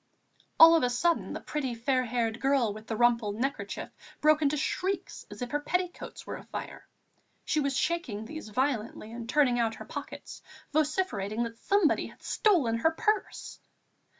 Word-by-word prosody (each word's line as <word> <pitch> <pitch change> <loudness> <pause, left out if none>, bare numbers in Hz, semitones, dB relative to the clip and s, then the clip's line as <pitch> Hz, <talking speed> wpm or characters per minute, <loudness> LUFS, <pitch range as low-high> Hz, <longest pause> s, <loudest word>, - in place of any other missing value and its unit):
All 330 +1 +10
of 325 - +4
a 250 - +2
sudden 330 +8 +1
the - - -4
pretty, 270 -5 -3
fair 255 +2 +1
haired 230 -1 -1
girl 265 -6 +2
with 215 +1 -11
the 225 - -2
rumpled 230 -3 +2
neckerchief 270 +5 -3 0.3
broke 305 0 +4
into 300 0 +2
shrieks 375 +5 -2
as - - -6
if 245 - -6
her 295 - +1
petticoats 360 +4 -3
were - - -5
afire. - - -8 0.6
She 310 - +1
was 280 -2 0
shaking 305 -10 -1
these 310 -1 -8
violently 235 -3 -2
and 235 0 -7
turning 255 -4 +3
out 225 -1 +1
her - - -9
pockets, - - -8 0.3
vociferating 285 - 0
that 230 -1 -6
somebody 400 -5 +2
had - - -17
stolen 300 - +2
her 275 +8 +3
purse. 415 +5 -2
265 Hz, 165 wpm, -29 LUFS, 230-310 Hz, 0.6 s, All